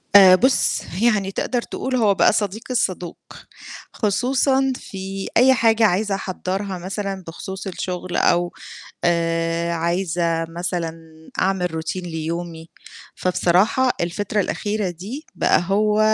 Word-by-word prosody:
آآ 190 -2 +10
بُصّ 260 +8 +2 0.2
يعني 210 -5 +2
تقدر 245 +4 -1
تقول 260 +2 -4
هو 215 -5 +4
بقى - - +4
صديقي 210 +4 -2
الصدوق، 180 -6 -1 0.8
خصوصًا 265 +5 +1
في 195 -4 -6
أي 260 +3 +6
حاجة 225 -2 +3
عايزة 205 +1 +1
أحضّرها 190 0 -3
مثلًا 195 +1 -4
بخصوص 190 +4 -7
الشغل، 180 -1 -4
أو 175 0 +2 0.5
آآ 165 0 +1
عايزة 170 -1 0
مثلًا 170 0 -3 0.5
أعمل 185 -1 +1
Routine 160 +3 -4
ليومي، 165 0 -5 0.5
فبصراحة 185 +8 +2
الفترة 205 +4 -1
الأخيرة 205 0 -2
دي 210 - -8
بقى - - +3
هو 210 +2 +2
190 Hz, 115 wpm, -21 LUFS, 175-215 Hz, 0.8 s, آآ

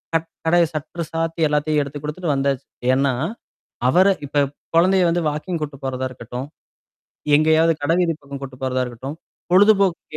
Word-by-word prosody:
Cut 165 0 0 0.2
கடை 175 +1 +5
சட்ற 160 +3 -4
சாத்தி 165 0 -2
எல்லாத்தையும் 150 0 +1
எடுத்து 140 +1 -7
குடுத்துட்டு 150 +1 -2
வந்தாச்சு. 135 -1 -1 0.3
ஏனா? 135 0 +2 0.8
அவர 185 +7 +5 0.2
இப்ப 145 0 +2 0.3
குழந்தைய 185 +2 +4
வந்து 175 +1 +1
வாக்கிங் 155 +3 -4
கூட்டு 140 -2 -6
போறதா 130 0 -2
இருக்கட்டும். 125 +3 -7 0.9
எங்கேயாவது 160 +2 +4
கடவீதி 165 +2 +2
பக்கம் 140 -1 -8
கூட்டிட்டு 130 -1 -9
போறதா 130 0 0
இருக்கட்டும். 130 +5 -7 0.4
பொழுதுபோக்கு 195 -2 +4
150 Hz, 140 wpm, -21 LUFS, 135-170 Hz, 0.9 s, கடை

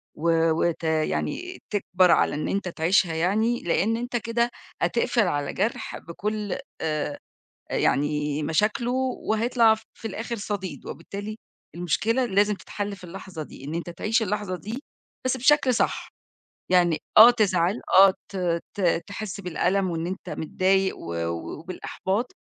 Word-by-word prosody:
و 165 0 +2
وت 165 +1 0
يعني 160 - -1
تكبر 185 -3 +3
على 155 - +3
إن 150 - -2
أنت 200 -1 -1
تعيشها 170 +1 +2
يعني، 210 +9 +1
لإن 195 +6 +1
أنت 245 +1 -4
كده 235 +1 0 0.3
هتقفل 235 -2 +2
على 145 -4 -1
جرح 210 +5 -2
بكل 205 +4 -4 0.2
آآ، 155 -2 -2 0.5
آآ، - - -1
يعني 150 +1 +1
مشاكله 210 - +1 0.4
وهيطلع 225 0 +4
ف 220 - -15
في 225 - -6
الآخر 230 +2 -4
صديد، 205 -3 -5
وبالتالي 205 +2 -6 0.4
المشكلة 220 - +1
لازم 205 -1 +3
تتحل 200 +2 -5
في 185 - -17
اللحظة 180 -2 -7
دي، 140 - -13
إن 150 +3 -4
أنت 170 +1 -4
تعيش 215 +7 0
اللحظة 210 -2 -2
دي 225 - -6 0.4
بس 255 0 +1
بشكل 270 0 +4
صح، - - 0 0.6
يعني 175 -3 +4 0.2
آه 225 +3 +12
تزعل 195 -4 +1 0.2
آه 195 0 +9 0.2
ت 175 -3 -1 0.2
ت 175 -4 +2
تحس 200 -1 -6
بالألم 185 +1 0
وإن 165 0 -2
أنت 185 +2 -5
متضايق 190 +3 +1
و 85 - -6
و 85 - -4
وبالإحباط 190 +6 -3
190 Hz, 145 wpm, -25 LUFS, 170-220 Hz, 0.6 s, آه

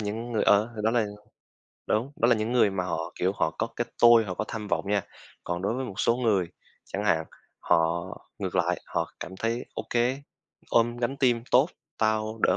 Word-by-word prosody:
những 110 +3 -4
người 110 - +1
ờ, 105 +3 +4
đó 110 - +3
là 115 -2 +2 0.8
đúng, 120 +6 0
đó 120 - +3
là 120 - +6
những 110 +1 -2
người 120 -5 +4
mà 95 -2 -2
họ, 80 -2 -3
kiểu, 95 +2 +1
họ - - 0
có 115 - +1
cái 120 - -1 0.2
tôi, 120 -1 +8
họ 95 -3 -4
có 110 - -2
tham 105 -2 -5
vọng - - 0
nha. 100 -1 +2 0.4
Còn 85 +1 -3
đối 100 +4 0
với 130 +1 -2
một 100 -6 -5
số 115 - +3
người, 105 -8 +1 0.4
chẳng 100 +2 -4
hạn, 80 -5 +2 0.4
họ 85 +1 +2 0.3
ngược - - -3
lại, - - +1
họ - - -2
cảm 95 - -7
thấy: 115 +4 -2
"Ô - - -3
kê, 125 +3 +1 0.5
ôm 120 +1 +3
gánh 120 +3 -2
team 120 -4 +2
tốt, 130 +6 +5 0.3
tao 110 0 0
đỡ - - +4
110 Hz, 210 wpm, -27 LUFS, 100-120 Hz, 0.8 s, tôi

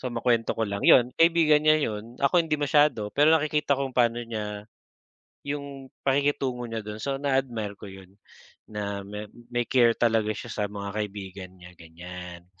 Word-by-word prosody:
So, 130 - -3
makuwento 115 -1 +1
ko 115 - 0
lang. 100 0 -4
'Yon, 125 0 +6
kaibigan 165 -3 +5
niya 155 0 +5
'yon, 115 -2 -4
ako 140 +6 +4
hindi 160 -2 -1
masyado. 145 -7 +2
Pero 150 +2 +5
nakikita 150 -2 +1
kong 135 -2 -3
pano 120 -1 +3
niya 105 -3 -6 0.8
yung 140 -1 -5 0.2
pakikitungo 135 -3 0
niya 115 -1 -5
do'n, 105 0 -7
so 140 -1 -1
na 140 -2 +2
admire 115 -6 -4
ko - - -10
'yon, 95 -1 -13 0.6
na 100 -2 -4
ma 105 +1 -7 0.3
may 120 0 0
care 120 -3 +4
talaga 110 -2 +2
siya 120 - -8
sa 105 - -1
mga 100 -1 -6
kaibigan 95 -2 -7
niya, 90 0 -13
ganiyan. 90 +1 -10
115 Hz, 170 wpm, -26 LUFS, 105-140 Hz, 0.8 s, Yon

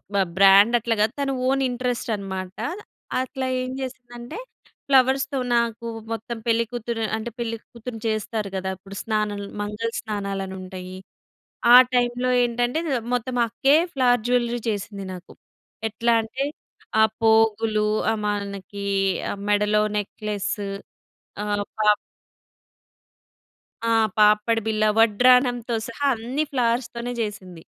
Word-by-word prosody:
బ - - +3 0.2
బ్రాండ్ 200 +4 +7
అట్లా 230 0 0
కాదు. 220 +3 +2
తన 275 -1 0 0.2
ఓన్ 270 0 +2
ఇంట్రెస్ట్ 245 -1 -2
అనమాట. 190 -2 -6 0.6
అట్లా 260 0 -4 0.2
ఏం 255 - -4
చేసిందంటే 245 - -8 0.5
ఫ్లవర్స్‌తో 270 0 +3 0.2
నాకు 235 0 0 0.3
మొత్తం 225 +1 -4
పెళ్ళికూతురు 230 0 -1
అంటే, 230 +2 -5
పెళ్ళి 230 -1 -2 0.2
కూతురుని 235 -1 -7
చేస్తారు 215 -1 -2
గద, 190 0 -3
ఇప్పుడు 195 +1 -12
స్నానాలు, 210 -2 -1
మంగళ 210 +2 -3
స్నానాలనుంటాయి. 190 -3 -5 0.8
ఆ - - +13 0.2
టైంలో 245 +1 +1
ఏంటంటే 245 +5 0 0.3
మొత్తం 245 +1 -2
అక్కే 270 +5 +3 0.2
ఫ్లవర్ 245 -3 +3
జ్యువెల్లరీ 240 -1 +1
చేసింది 200 -1 -5
నాకు. 180 0 -11 0.6
ఎట్లా 235 +2 0
అంటే 260 +5 -3 0.6
ఆ - - +7 0.2
పోగులు 220 -1 +3 0.3
ఆహ్, 220 - -2
మనకి 200 -1 -4 0.6
మెడలో 210 +1 +3 0.2
నెక్లెస్సు 205 0 -3 0.8
ఆహ్, 205 -1 -1
పా 210 -1 +5 2.0
ఆ! - - +2 0.3
పాపడి 210 +2 +4
బిళ్ళ, 215 -1 +1 0.2
వడ్రాణంతో 245 +1 +4
సహా 280 +5 -2
అన్ని 250 +7 -2
ఫ్లావర్స్‌తోనే 240 -1 -1
చేసింది. 185 -6 -6
225 Hz, 110 wpm, -23 LUFS, 205-245 Hz, 2.0 s, ఆ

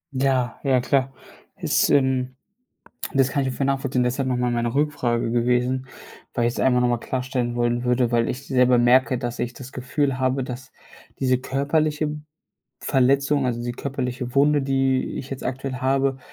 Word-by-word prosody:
Ja, 130 -3 0
ja 135 -3 +3
klar. 135 +1 +1 0.5
Das - - +2
ähm, 130 -2 +2 0.8
das 135 -1 +3
kann 140 -2 0
ich 130 - -2
voll 135 - -1
nachvollziehen, 135 -2 0
deshalb 130 +2 -1
noch 125 -1 0
mal 125 0 0
meine 120 0 -1
Rückfrage 125 -6 0
gewesen, 125 +2 +1 0.5
weil 120 -1 +1
ich's 120 - -3
einfach 125 -1 +3
noch 125 - +3
mal 120 -1 +1
klarstellen 125 -2 -2
wollen 120 0 0
würde, 125 -1 +1
weil 115 -1 +2
ich 135 +3 -5
selber 125 -2 +4
merke, 125 +2 +4
dass 120 -1 -5
ich 120 0 -2
das 130 +1 -10
Gefühl 135 +1 -1
habe, 130 +1 +1
dass 125 0 -8 0.5
diese 130 -2 +2
körperliche 150 +3 0 0.7
Verletzung, 140 +2 +2
also, 120 -1 -2
die 120 0 -3
körperliche 125 -1 -4
Wunde, 145 +1 +4
die 135 -1 +1
ich 130 - -7
jetzt 135 - -6
aktuell 130 +1 -3
habe, 135 +1 +1
130 Hz, 170 wpm, -23 LUFS, 125-135 Hz, 0.8 s, selber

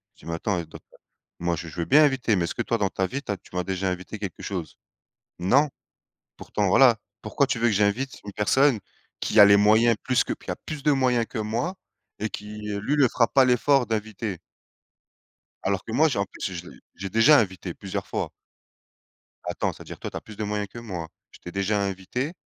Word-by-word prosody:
je - - -27
dis: - - -16
«Mais 85 - -4
attends, 90 0 -1 0.8
moi, 85 0 0
je 85 - -6
je 85 - -8
veux 85 - 0
bien 150 +3 +6
inviter, 130 -6 +1
mais 85 -2 +1
est-ce - - -5
que 120 - -1
toi, 115 - 0
dans 100 -2 +1
ta 95 - -1
vie, 140 +6 -4
tu - - -4
as 100 - -2
tu 90 - -17
m'as 90 - 0
déjà 95 0 -1
invité 95 +4 -5
quelque 100 -4 -6
chose? 90 -6 -5 0.6
Non, 135 +12 +3 0.7
pourtant 100 -2 -1
voilà.» 120 +2 +6 0.3
Pourquoi 135 +6 +1
tu 130 -3 -1
veux 120 - +2
que - - +1
j'invite 105 +7 0
une 100 - -7
personne 130 +5 +3 0.4
qui 110 - +4
a - - +12
les 100 0 +7
moyens 110 +3 +5
plus 130 -1 +2
que - - -3
qui - - -9
a - - -2
plus 150 -3 -5
de 150 - +4
moyens 125 -4 +2
que 120 - -5
moi 115 - -2 0.5
et 110 - -1
qui, 105 0 -7
heu, 100 - -2
lui, 140 - 0
le 140 -3 +5
fera 115 0 +2
pas 135 -2 +5
l'effort 125 +1 +3
d'inviter. 110 -2 -3 1.3
Alors 95 0 0
que 115 - -6
moi, 155 +7 +4
j'ai 140 - -1
en 100 - +1
plus, 95 0 -6
je 90 0 -7
l'ai - - -14 0.2
j'ai 95 +1 -5
déjà 115 +9 +6
invité 95 -4 -2
plusieurs 95 -2 -5
fois. - - -3 1.1
Attends, - - -2
c'est-à-dire, - - -10
toi, - - -5
tu - - -5
as - - -7
plus 110 -1 -12
de 110 - -3
moyens 105 0 -2
que 120 - -12
moi, 90 -9 -6 0.2
je - - -16
t'ai 90 - -9
déjà 100 +2 0
invité, 100 - -3
105 Hz, 225 wpm, -25 LUFS, 95-125 Hz, 1.3 s, a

